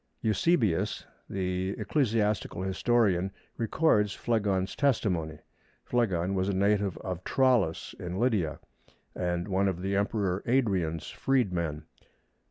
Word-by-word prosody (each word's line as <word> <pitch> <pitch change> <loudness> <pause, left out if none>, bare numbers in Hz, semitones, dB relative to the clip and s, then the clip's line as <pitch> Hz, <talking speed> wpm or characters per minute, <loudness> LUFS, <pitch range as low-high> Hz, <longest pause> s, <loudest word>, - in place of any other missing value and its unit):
Eusebius, 110 - +1 0.2
the 95 0 -2
ecclesiastical 105 - 0
historian, 95 -1 +2 0.3
records 110 -4 +2
Phlegon's 100 -5 0
testimony. 90 - 0 0.5
Phlegon 95 -7 0
was 95 0 0
a 100 - 0
native 100 -1 +1
of 90 -3 -5
Tralles 125 -11 +1
in 90 +1 -4
Lydia, 100 -10 +1 0.6
and 90 0 -2
one 100 0 +1
of 95 -3 -1
the 100 +1 0
Emperor 100 -2 0
Adrian's 95 - 0
freedmen. 90 - 0
100 Hz, 105 wpm, -29 LUFS, 90-110 Hz, 0.6 s, historian